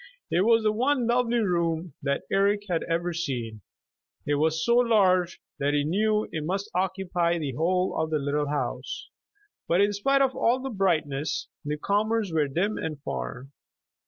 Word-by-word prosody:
It 175 - +3
was 230 -1 +4
the 215 - +3
one 250 +3 +1
lovely 240 0 +2
room 170 -3 -1
that 140 0 -1
Eric 200 +1 +2
had 170 -3 0
ever 170 +1 0
seen. 125 -10 -4 0.6
It 145 - 0
was 160 +2 +1
so 235 0 +4
large 190 -7 +3 0.2
that 145 +1 +1
he 145 - +2
knew 210 +7 +1
it 155 - -3
must 195 +5 -3
occupy 180 -2 0
the 150 -4 -3
whole 180 +6 0
of 160 0 -1
the 155 - +1
little 145 +1 -1
house. 145 0 -4 0.6
But 170 - +2
in 205 +1 +3
spite 275 +7 +2
of 265 -1 0
all 245 +3 +2
the 265 0 -5
brightness, 155 -8 -1
the 150 +1 -3
comers 210 +2 0
were 155 -2 +2
dim 185 +10 -1
and 155 -3 -4
far. 65 - -5
175 Hz, 170 wpm, -26 LUFS, 150-210 Hz, 0.6 s, was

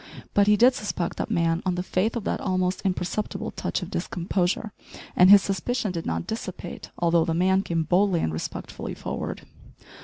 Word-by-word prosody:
But 205 0 +4
he 210 0 +5
did 250 +4 +6
suspect 205 -7 -3
that - - -3
man 170 -4 +1
on 185 -2 0
the 180 - -2
faith 190 +5 0
of 235 - -3
that - - -2
almost 185 -1 0
imperceptible 190 +2 -2
touch - - -3
of - - -8
discomposure, 180 +4 -1 0.4
and 180 +1 +7
his 200 -1 +9
suspicion 210 +2 -1
did 165 -2 -4
not 80 0 -2
dissipate 185 -5 -6
although 170 -1 +3
the 165 0 -1
man 190 +2 +3
came 165 -4 -1
boldly 180 +2 +2
and 80 - -1
respectfully 80 - -5
forward. - - -5
185 Hz, 180 wpm, -25 LUFS, 170-205 Hz, 0.4 s, his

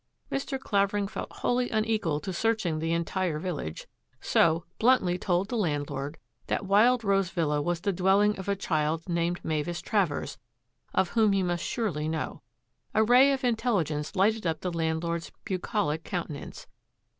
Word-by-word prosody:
Mr. 275 0 -2
Claver 200 -4 +1
ing 200 -1 0
felt - - -6
wholly 245 0 0
unequal 215 -8 0
to 190 - -4
searching 205 -5 0
the 165 +1 -1
entire 170 0 -1
vil 175 0 -3
lage, 80 - -6 0.3
so 165 +1 +2
bluntly 220 -7 +4
told 180 +1 0
the 245 - -2
landlord 145 - -2 0.3
that - - -1
Wild 225 +5 +4
Rose 195 -3 +2
Villa 150 -5 0
was 170 +2 -1
the 200 0 0
dwelling 195 +3 +3
of 190 - -5
a 200 - +2
child 160 -3 -1
named 170 0 -1
Mavis 160 +2 -1
Travers, 185 -6 -1 0.5
of 185 - +1
whom 220 -3 +3
he 195 -1 +2
must 175 -1 -1
surely 175 -11 -2
know. 160 0 -3 0.5
A 220 - +5
ray 250 +5 +6
of 270 -1 -1
intelligence 205 - 0
lighted 210 +1 +2
up 160 -1 -1
the 180 -2 -3
landlord's 165 +1 -2
bucolic 180 -5 -1
countenance. 170 -6 -5
180 Hz, 160 wpm, -28 LUFS, 160-210 Hz, 0.5 s, ray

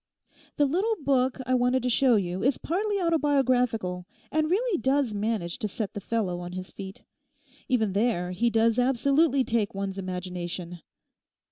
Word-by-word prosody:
The 290 - +4
little 380 +11 +1
book 260 -2 +2
I 255 - 0
wanted 250 0 +2
to 250 - +1
show 255 0 +4
you 185 -2 -1
is 265 +3 +2
partly 405 +4 -1
autobiographical 255 - +1 0.2
and 310 0 +1
really 405 0 +1
does 265 -3 +1
manage 205 -4 -2
to 215 - -1
set 210 0 -4
the 205 - -5
fellow 195 -5 -2
on 175 0 -7
his 185 0 -6
feet. 195 0 -9 0.6
Even 220 -6 +1
there 200 -4 0
he 230 +6 +1
does 230 +1 +2
absolutely 275 +3 +3
take 225 -5 -1
one's 195 0 -3
imagination. 180 -1 -5
230 Hz, 155 wpm, -27 LUFS, 190-275 Hz, 0.6 s, The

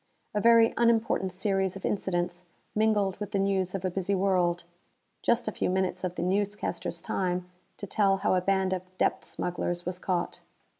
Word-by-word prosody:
A 210 - 0
very 230 0 +6
unimportant 225 -5 +2
series 190 0 0
of 195 - -6
incidents 175 -2 -1 0.3
mingled 210 -3 +2
with 210 0 -5
the - - +2
news 195 -1 0
of 190 -1 -3
a 185 - 0
busy 195 +2 -1
world 180 -3 +1 0.6
just 235 0 +1
a - - 0
few - - -1
minutes 185 0 0
of 180 -1 -2
the - - -2
newscasters' 205 +3 -2
time 180 -1 -1 0.3
to - - -5
tell 195 0 +2
how 195 - +1
a 185 - +3
band 190 0 +1
of 185 - -1 0.2
depth - - +1
smugglers 175 0 -3
was 180 0 -3
caught. 180 -2 -2
190 Hz, 180 wpm, -28 LUFS, 180-205 Hz, 0.6 s, very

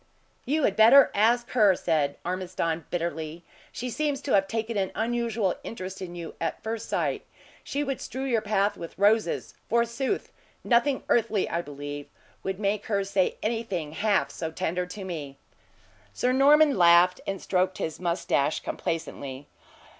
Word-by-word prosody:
"You 300 +3 +1
had 200 - +2
better 245 +5 +7
ask 235 +4 +2
her," 210 -6 +5
said 150 -5 0
Ormiston, 175 -2 -2
bitterly. 165 -1 -3 0.3
"She 250 0 -5
seems 295 0 -1
to 280 - -4
have 195 -1 +4
taken 225 +1 -3
an 195 -2 0
unusual 230 -4 0
interest 190 -3 -7
in 175 -2 -6
you 170 -2 -7
at 165 - -3
first 225 0 -4
sight. - - -1 0.4
She 285 +1 -2
would 275 -2 -3
strew 260 +1 -5
your 240 -5 +1
path 210 -1 +1
with 170 - -8
roses, 205 -2 +2 0.2
forsooth! 235 - 0 0.3
Nothing 260 +3 +2
earthly, 220 -4 +2
I 170 - -1
believe, 145 -1 -7 0.3
would 190 0 -4
make 205 0 -1
her 200 -2 +1
say 195 -1 +1
anything 215 -9 -2
half 205 +6 +1
so 160 - -4
tender 180 +3 -2
to 195 +2 -7
me." 150 -7 -6 0.8
Sir 250 - +1
Norman 285 0 +5
laughed, 175 +1 +6
and 195 -1 -2
stroked 185 0 0
his 160 - -4
moustache 170 -4 0
complacently. 140 -4 -4
195 Hz, 155 wpm, -27 LUFS, 170-235 Hz, 0.8 s, better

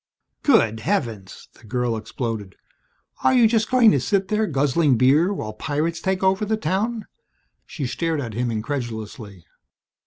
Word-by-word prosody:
"Good 115 - +3
heavens!" 115 - -3
the - - -22
girl 120 +1 -1
exploded. 110 -3 -5 0.7
"Are 260 - +4
you 240 -3 +6
just 220 -1 +1
going 250 -4 +6
to 140 - +2
sit 190 +10 0
there 215 0 +1
guzzling 145 -1 +2
beer 145 - +4
while 110 - -4
pirates 155 +8 -2
take 190 0 -1
over 190 +2 +2
the 215 +1 0
town?" 220 +2 -2 0.6
She 145 - -5
stared 160 +4 -2
at 115 -5 -5
him 120 +2 -1
incredulously. 110 - -5
145 Hz, 150 wpm, -22 LUFS, -, 0.7 s, you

